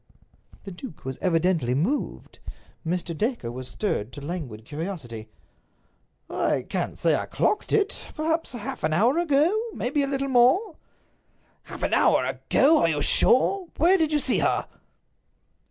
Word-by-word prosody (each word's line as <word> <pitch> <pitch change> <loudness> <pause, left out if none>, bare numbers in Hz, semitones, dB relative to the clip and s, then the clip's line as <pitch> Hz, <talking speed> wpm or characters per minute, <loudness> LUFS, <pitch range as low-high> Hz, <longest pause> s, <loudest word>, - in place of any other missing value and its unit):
The 195 - -8
duke 180 - -10
was 130 -1 -5
evidently 165 -7 +1
moved. 195 - -2 0.4
Mr. 170 0 -2
Dacre 215 - -2
was 130 +1 -7
stirred 125 - -3
to - - -7
languid 140 -11 -6
curiosity. 145 - -6 1.0
"I - - -1
can't - - -3
say - - +2
I - - -3
clocked 425 - 0
it. 410 -2 +1 0.2
Perhaps 320 0 -1
half 235 -4 -6
an 155 0 +1
hour 235 - +3
ago; 295 -4 +3 0.3
perhaps 250 +4 -3
a 280 -1 +2
little 275 0 -2
more." 270 - +3 0.9
"Half - - -9
an - - 0
hour - - +4
ago! 305 +3 +3
Are 165 - +3
you 150 -2 0
sure? 365 +9 +3
Where 345 +5 +5
did 315 -1 +1
you 300 - +3
see 270 -3 +2
her?" - - 0
210 Hz, 150 wpm, -25 LUFS, -, 1.0 s, Where